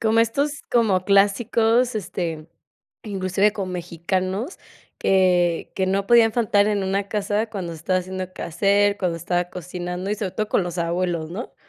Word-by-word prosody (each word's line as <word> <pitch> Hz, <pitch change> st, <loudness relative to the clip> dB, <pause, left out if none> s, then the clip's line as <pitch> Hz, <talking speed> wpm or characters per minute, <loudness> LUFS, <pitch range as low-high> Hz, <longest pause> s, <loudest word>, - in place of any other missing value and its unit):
Como 225 Hz, 0 st, +3 dB
estos 280 Hz, +6 st, 0 dB
como 210 Hz, -6 st, +2 dB
clásicos, 225 Hz, +4 st, +3 dB
este, 170 Hz, -5 st, -4 dB, 0.5 s
inclusive 195 Hz, 0 st, +1 dB
con 195 Hz, -3 st, -4 dB
mexicanos, 185 Hz, -, -3 dB, 0.4 s
que 180 Hz, -3 st, +2 dB
que 190 Hz, -, 0 dB
no 195 Hz, +1 st, 0 dB
podían 230 Hz, -1 st, +5 dB
faltar 210 Hz, -3 st, +2 dB
en 205 Hz, -2 st, 0 dB
una 195 Hz, +1 st, -1 dB
casa 210 Hz, +1 st, -1 dB
cuando 185 Hz, -6 st, -5 dB
estaba 165 Hz, +4 st, 0 dB
haciendo 185 Hz, 0 st, -5 dB
quehacer, 200 Hz, +4 st, +1 dB
cuando 180 Hz, -4 st, -1 dB
estaba 175 Hz, +1 st, 0 dB
cocinando 180 Hz, +1 st, -5 dB
y, -, -, +1 dB
sobre 200 Hz, -3 st, -3 dB
todo, 215 Hz, -1 st, -2 dB
con -, -, +2 dB
los 175 Hz, 0 st, -5 dB
abuelos, 170 Hz, -1 st, -1 dB
¿no? 205 Hz, +8 st, -6 dB
195 Hz, 155 wpm, -23 LUFS, 180-210 Hz, 0.5 s, podían